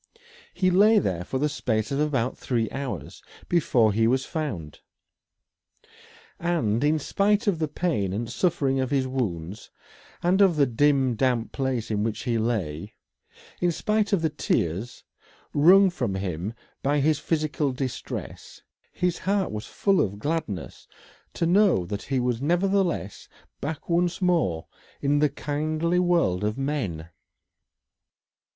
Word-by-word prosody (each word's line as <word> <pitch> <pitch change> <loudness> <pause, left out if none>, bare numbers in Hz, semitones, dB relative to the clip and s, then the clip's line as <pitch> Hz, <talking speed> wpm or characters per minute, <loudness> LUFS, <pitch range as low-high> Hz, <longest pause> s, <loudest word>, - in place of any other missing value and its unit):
He 185 -1 +1
lay 210 +4 +5
there 90 - 0
for 130 - -3
the 150 +3 +1
space 110 -6 -2
of 140 - -1
about 135 -5 0
three 115 -3 -1
hours 135 -2 -5 0.3
before 120 -10 +3
he 110 +2 +3
was 130 +3 +1
found. 105 - -5 1.6
And 145 -10 0
in 150 +2 +3
spite 205 - +1
of 195 -6 +1
the 155 - 0
pain 145 - -1
and 110 +4 -3
suffering 135 0 0
of 130 -1 -1
his 135 -2 +1
wounds, 100 -8 -4 0.5
and 185 +3 +3
of 190 -4 +5
the 145 -2 +4
dim 135 +1 +2
damp 120 -1 0
place 130 -5 -2
in 105 -1 0
which 110 -1 -3
he 115 -2 0
lay; 105 -5 -2 0.6
in 175 -1 +2
spite 210 +4 0
of 190 -5 +1
the 160 - +1
tears 100 - -2 0.5
wrung 185 +6 +6
from 120 - -2
him 95 +2 -3 0.3
by 145 +2 +1
his 150 +1 +2
physical 150 -3 -1
distress 130 -1 -6 0.3
his 180 -1 -1
heart 195 -1 0
was 105 +1 -5
full 195 -2 +2
of 100 0 -2
gladness 145 - -4 0.5
to 170 - 0
know 180 - +4
that 100 +3 -4
he 135 -1 -1
was 125 -1 -1
nevertheless 175 - 0 0.3
back 150 +3 -5
once 175 +1 +1
more 165 - +1 0.3
in 145 +1 +1
the 150 0 +3
kindly 155 +5 -1
world 170 - +2
of 105 +3 -1
men. 125 - -3
140 Hz, 145 wpm, -25 LUFS, 110-170 Hz, 1.6 s, wrung